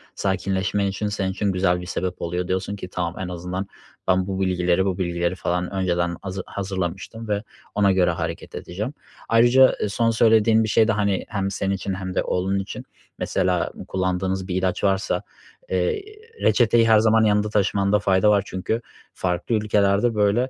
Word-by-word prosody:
sakinleşmen 95 +1 0
için, 100 +2 -2
senin 100 -2 -1
için 100 +1 -1
güzel 90 -1 +1
bir - - -7
sebep 90 0 -3
oluyor. 90 +1 -2
Diyorsun 95 +2 -2
ki 95 - -7
"Tamam, 85 -1 -3
en 95 - -3
azından 90 +2 -4 0.4
ben 95 0 +2
bu 95 -1 -3
bilgileri 90 -1 +1
bu 95 -2 -1
bilgileri 85 -1 -1
falan 90 0 -2
önceden 90 -2 0
hazı 95 -1 -5
hazırlamıştım 95 +3 -4
ve 105 0 -1 0.3
ona 100 -1 +4
göre 90 -2 +3
hareket 80 0 -5
edeceğim." 105 +10 -5 0.4
Ayrıca, 120 +3 +6
eee, 105 - 0
son 115 +3 +1
söylediğin 110 0 +4
bir 110 - -2
şey 110 +1 +4
de, - - +3
hani, 100 -2 0
hem 100 -1 -2
senin 95 0 -1
için 95 0 -4
hem 95 0 -5
de - - +1
oğlun 95 +2 0
için 95 - -6 0.4
mesela 90 -1 0 0.2
kullandığınız 95 0 -1
bir 90 - -3
ilaç 95 -1 -1
varsa, 95 -1 +1 0.5
eee, 445 -3 0 0.4
reçeteyi 115 -1 +4
her 110 -1 +7
zaman 110 0 +4
yanında 105 0 +2
taşımanda 100 0 +2
fayda 100 0 +3
var. 100 -2 +4
Çünkü 105 +5 -2 0.3
farklı 90 +5 -1
ülkelerde, 105 +1 +2
böyle, 105 +5 +2
95 Hz, 175 wpm, -23 LUFS, 90-105 Hz, 0.5 s, her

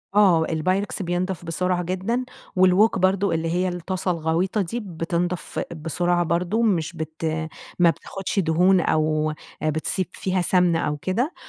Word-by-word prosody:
آه، 180 -6 +5
البايركس 185 +7 -1
بينضَف 175 0 -2
بسرعة 180 +2 0
جدًا، 190 +8 -1 0.3
والووك 185 +3 +4
برضه 190 +1 +2
اللي 165 0 -1
هي 180 +1 +1
الطاسة 180 +1 -2
الغويطة 170 +5 0
دي، 195 +6 -3
بِتِنضَف 175 -2 -3 0.2
بسرعة 175 +2 0
برضه، 175 +6 0
مش 185 -6 +1
بت 160 0 -5 0.5
ما 175 -1 +6
بتاخدش 195 +4 -3
دهون 180 +2 +4
أو 155 -1 +1 0.3
بتسيب 155 +4 -1
فيها 185 0 -1
سمنة 175 -2 +3
أو 150 -2 -1
كده، 230 - -1
180 Hz, 135 wpm, -23 LUFS, 165-190 Hz, 0.5 s, ما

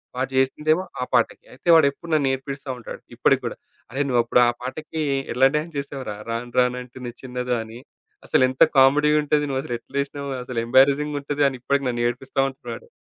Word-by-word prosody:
వాడు 130 +1 -1
జేసిందేమో 150 +6 +2 0.2
ఆ - - +1
పాటకి. - - +1
అయితే 130 - -15
వాడెప్పుడు 155 +1 +2
నన్ను 150 -3 +3
ఏడిపిస్తా 135 +1 -6
ఉంటాడు. 120 - -9
ఇప్పటికి - - +3
కూడా, - - -3 0.4
"అరె 135 +4 -2
నువ్వప్పుడు 120 0 +3
ఆ - - +4
పాటకి 155 +5 -4 0.3
ఎలా 130 +2 +5
డాన్స్ 155 +1 -2
చేసావురా! 140 -6 -5
'రాను 115 +1 -4
రాను 125 0 +2
అంటుంది 125 0 -8
చిన్నదో' 125 -1 -2
అని 110 +1 -11 0.5
అసలెంత 130 0 +4
కామెడీగా 150 +3 +5
ఉంటది. 150 0 +1
నువ్వసలు 135 -2 -2
ఎట్లేసినవు. 140 +2 -4
అసలు 125 -2 -3
ఎంబరాజింగ్‌గా 140 +4 +3
ఉంటది" 145 +1 -1
అని 130 - -7
ఇప్పటికి 140 +2 0
నన్ను 120 -1 -1
ఏడిపిస్తా 130 +3 -2
ఉంటాడు 130 -3 -10
ఆడు. - - -18
135 Hz, 170 wpm, -23 LUFS, 125-145 Hz, 0.5 s, ఎలా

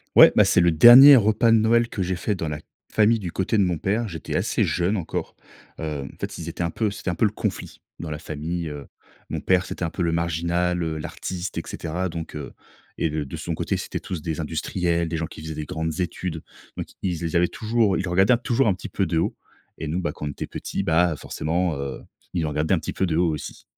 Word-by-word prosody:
Ouais, - - +10
bah, - - +5
c'est 90 - +4
le 85 - +4
dernier 125 - +10
repas 110 +1 +3
de 115 - +6
Noël 115 +2 +3
que 100 - -4
j'ai 95 0 -1
fait 100 +3 -1
dans 80 - -4
la 75 0 -4 0.3
famille 110 +1 +3
du 90 -4 -6
côté 95 +4 0
de 100 - +4
mon 90 -3 0
père. 105 +7 -1
J'étais 80 -5 -6
assez - - +1
jeune 90 +4 0
encore. 90 -6 -4 0.5
Heu, 75 -3 -3
en - - -12
fait, - - -5
ils 85 - -7
étaient 85 +1 -4
un 85 - 0
peu 110 +3 0
c'était 100 -2 -5
un 90 - -1
peu 110 - +2
le 105 - +1
conflit 105 -3 -4 0.2
dans 85 - -5
la 75 - -4
famille, 80 +2 -4
heu. 75 -1 -8 0.4
Mon - - -3
père, 95 0 +2
c'était - - -5
un 85 - 0
peu 85 - -3
le 85 - +1
marginal, 85 +2 0
heu, 80 -1 -2
l'artiste, 90 +4 -5
et - - 0
cetera. 90 +3 -3
Donc, 80 -2 -6
heu, 75 - -7 0.4
et 80 - 0
de 75 -1 -3
de 65 - -7
son - - -4
côté, - - -1
c'était - - -4
tous 90 -4 -6
des 80 0 -4
industriels, 85 +2 -1
des 80 - -2
gens 80 - -2
qui - - -11
faisaient 80 0 -6
des 75 0 -4
grandes 80 +2 -3
études. 90 -2 -3 0.4
Donc - - -4 0.2
ils 85 -3 -2
ils 85 0 -3
avaient 85 +1 +3
toujours 110 -3 +1
ils - - -1
le 95 - -3
regardaient 95 +7 +4
toujours 120 0 +2
un - - +3
petit 90 - -8
peu 95 - 0
de 85 -1 -1
haut. 80 - 0 0.4
Et 80 - -4
nous, 85 +4 -1
bah, 85 -5 -2
quand 75 - -7
on - - -2
était - - -6
petits, - - -4
bah, 85 +1 +3
forcément, 85 +3 -2
heu, 70 -1 -5 0.3
ils 85 - 0
nous - - -1
regardaient 75 +4 0
un 90 - +3
petit 80 - -5
peu 95 - 0
de 80 -3 0
haut 85 -2 +2
aussi. 75 - -7
85 Hz, 255 wpm, -24 LUFS, 80-95 Hz, 0.5 s, Ouais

